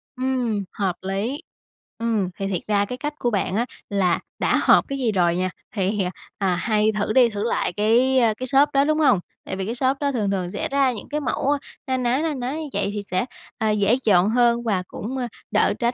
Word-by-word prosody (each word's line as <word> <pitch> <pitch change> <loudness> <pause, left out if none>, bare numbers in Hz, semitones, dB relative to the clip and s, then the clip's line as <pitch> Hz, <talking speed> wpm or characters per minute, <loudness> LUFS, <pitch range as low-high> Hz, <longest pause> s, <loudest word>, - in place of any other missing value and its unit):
Ừm, 250 -5 -1
hợp 190 -3 -1
lý. 205 - -2 0.6
Ừm, 220 -5 0
thì 195 - -1
thiệt 185 -3 -2
ra 205 -1 +2
cái 250 +4 -6
cách 295 +3 -3
của 240 - +1
bạn 195 -1 0
á 235 +2 +1 0.2
là 190 -4 +2 0.2
đã - - +2
hợp - - +6
cái 275 -1 -3
gì 240 -4 +1
rồi 175 -3 +2
nha, 185 +1 0 0.3
thì 195 -1 0 0.3
à, 190 -3 +1
hay 215 +3 +2
thử 215 +1 0
đi 250 -3 +6
thử 205 -1 -4
lại 230 -5 0
cái, 240 +5 +3
ơ, 225 -3 +3
cái 255 - -4
shop 275 +3 +4
đó, 275 0 +4
đúng 310 +1 +1
hông? 270 - +4 0.3
Tại - - -4
vì 190 0 -3
cái 230 - -3
shop 260 +2 +1
đó 285 -1 0
thường 210 -6 0
thường 185 -2 -2
sẽ - - -3
ra 275 -2 +3
những 215 - -9
cái 300 +1 -1
mẫu 280 +1 0 0.4
na 260 0 +1
ná, 250 +1 +1
na 320 -2 0
ná 255 -1 -3
như 310 -1 -5
vậy - - 0
thì 205 - -4
sẽ, 185 +5 +1 0.3
ờ, 220 -1 0
dễ 210 +2 +3
chọn 195 -1 +5
hơn 235 0 +3
và 195 -5 0
cũng, 255 +5 -5
ơ, 245 -2 -2 0.2
đỡ - - +3
tránh 240 +1 +1
225 Hz, 235 wpm, -23 LUFS, 200-260 Hz, 0.6 s, hợp